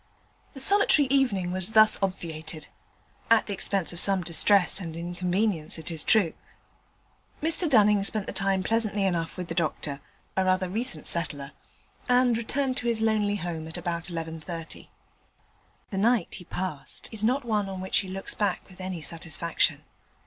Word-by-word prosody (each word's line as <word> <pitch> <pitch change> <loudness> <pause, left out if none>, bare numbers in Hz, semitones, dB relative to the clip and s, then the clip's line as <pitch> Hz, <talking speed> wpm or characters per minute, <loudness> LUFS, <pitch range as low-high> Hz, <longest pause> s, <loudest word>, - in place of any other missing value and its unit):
The - - -6
solitary 315 -3 +6
evening 205 -10 +1
was 185 +3 +3
thus 215 0 +7
obviated; 160 -4 -4 0.6
at 225 -1 +5
the 205 - -4
expense 190 -2 +1
of 170 - -7
some 195 -1 +3
distress 180 +4 +3
and 165 -4 -7
inconvenience, 175 0 -1
it 160 +1 -7
is 160 -2 -3
true. 200 -7 +3 1.1
Mr 325 +2 +1
Dunning 210 -5 +4
spent 205 0 +2
the - - -6
time 195 -1 0
pleasantly 215 -2 0
enough 170 -3 -2
with 180 -1 -5
the 165 - -4
doctor 155 -4 -2 0.4
(a 190 - +2
rather 185 0 +1
recent 230 +7 -1
settler), 145 -4 -3 0.6
and 250 -1 +4
returned 255 +3 -1
to 245 - -2
his 225 -2 +2
lonely 210 -2 +1
home 170 -4 -5
at 160 - -7
about 170 -1 -4
11.30. 165 -1 -7 1.0
The 195 - -4
night 230 -2 +2
he 180 - -8
passed 165 -6 -5
is 220 -2 -3
not 255 +4 +1
one 210 -4 -1
on 190 -1 -6
which 190 0 +1
he 190 - -4
looks 195 +1 -3
back 205 -1 -2
with 185 -1 -14
any 185 -3 -5
satisfaction. 165 0 -2
190 Hz, 165 wpm, -26 LUFS, 170-220 Hz, 1.1 s, thus